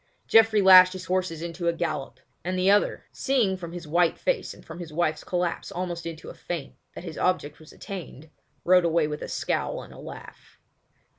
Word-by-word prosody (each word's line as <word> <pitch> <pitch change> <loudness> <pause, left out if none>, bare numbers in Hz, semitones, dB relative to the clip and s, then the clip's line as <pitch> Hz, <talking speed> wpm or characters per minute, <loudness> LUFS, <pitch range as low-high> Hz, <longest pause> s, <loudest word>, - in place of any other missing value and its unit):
Geoffrey 225 -2 +5
lashed 185 -1 +9
his 185 - -7
horses 180 -3 -1
into 170 0 -4
a 170 - +3
gallop, 145 -6 -4 0.2
and 185 +2 -2
the 185 +2 +4
other, 205 0 +2
seeing 245 -8 +1
from 170 -3 -8
his 175 -2 -8
white 170 +2 +2
face - - -1
and - - -14
from 165 +2 -9
his 170 -3 -8
wife's 155 0 -1
collapse 175 -1 -2
almost 175 -1 -4
into 165 -1 -8
a - - -12
faint 165 -6 -6 0.2
that - - -8
his 165 -4 -7
object 150 -5 0
was 155 - -15
attained, 160 -6 -9 0.3
rode 180 0 +5
away 170 -1 +2
with 150 0 -4
a - - -5
scowl - - -2
and - - -13
a - - -13
laugh. - - -12
175 Hz, 200 wpm, -26 LUFS, 165-185 Hz, 0.3 s, lashed